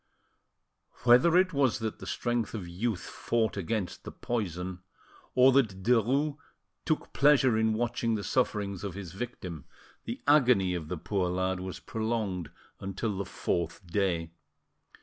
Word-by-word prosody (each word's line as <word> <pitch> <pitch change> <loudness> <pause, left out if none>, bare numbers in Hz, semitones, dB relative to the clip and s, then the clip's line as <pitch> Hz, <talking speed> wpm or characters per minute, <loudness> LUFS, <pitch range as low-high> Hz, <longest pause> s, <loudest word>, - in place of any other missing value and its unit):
Whether 125 +8 +6
it 185 0 +3
was 135 -5 +2
that 110 -1 -4
the - - -8
strength 120 -2 -1
of 95 -5 -5
youth 95 +3 -2
fought 115 -2 -1
against 100 0 -3
the - - -7
poison, 95 -6 -3 0.6
or 130 +1 +7
that 110 -8 +2
Derues 130 +6 +2 0.5
took 155 -2 -1
pleasure 140 -4 +5
in 110 0 +2
watching 120 0 0
the 105 - -3
sufferings 100 -6 0
of 100 -3 -4
his 95 -4 -7
victim, 95 - -6 0.4
the - - -4
agony 125 -11 +5
of 85 -3 -4
the 90 - -3
poor 90 +3 -1
lad 95 +1 -1
was 95 0 -6
prolonged 110 -7 -2 0.3
until 100 +2 -3
the 100 +1 -3
fourth 90 0 -2
day. 85 -3 0
105 Hz, 145 wpm, -29 LUFS, 95-120 Hz, 0.6 s, or